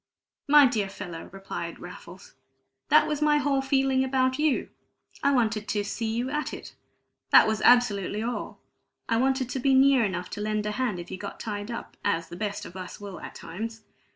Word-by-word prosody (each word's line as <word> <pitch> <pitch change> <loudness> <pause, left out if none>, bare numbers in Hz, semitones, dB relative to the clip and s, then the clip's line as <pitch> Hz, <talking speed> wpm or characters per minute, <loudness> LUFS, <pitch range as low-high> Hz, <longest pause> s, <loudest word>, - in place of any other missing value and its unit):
"My 295 0 +8
dear 215 -6 0
fellow," 180 -4 -8
replied 195 +1 -6
Raffles, - - -11 0.6
"that - - +6
was 300 -1 -2
my 300 0 +4
whole 285 -2 +1
feeling 270 -1 +2
about 260 0 +1
you. 300 -3 +1 0.5
I 280 - +3
wanted 220 -5 +1
to 205 -1 0
'see 220 +2 -3
you 240 +3 -2
at 300 +1 -2
it' - - -11 0.6
that - - +8
was 220 -1 0
absolutely 215 -4 +3
all. 240 +1 -4 0.5
I 230 - +1
wanted 265 +1 +1
to 265 - -2
be 270 +1 +3
near 265 -2 +5
enough 185 -3 -3
to 205 - -5
lend 215 0 -1
a 210 - -1
hand 215 -5 -1
if 175 - -9
you 185 - -6
got 200 - -7
tied 205 -1 -5
up, 235 - -7
as 165 -4 0
the - - -8
best 205 +1 -4
of 175 - -11
us 185 +2 -8
will 200 -2 -8
at - - -9
times. 220 +6 -7
225 Hz, 195 wpm, -27 LUFS, 205-265 Hz, 0.6 s, My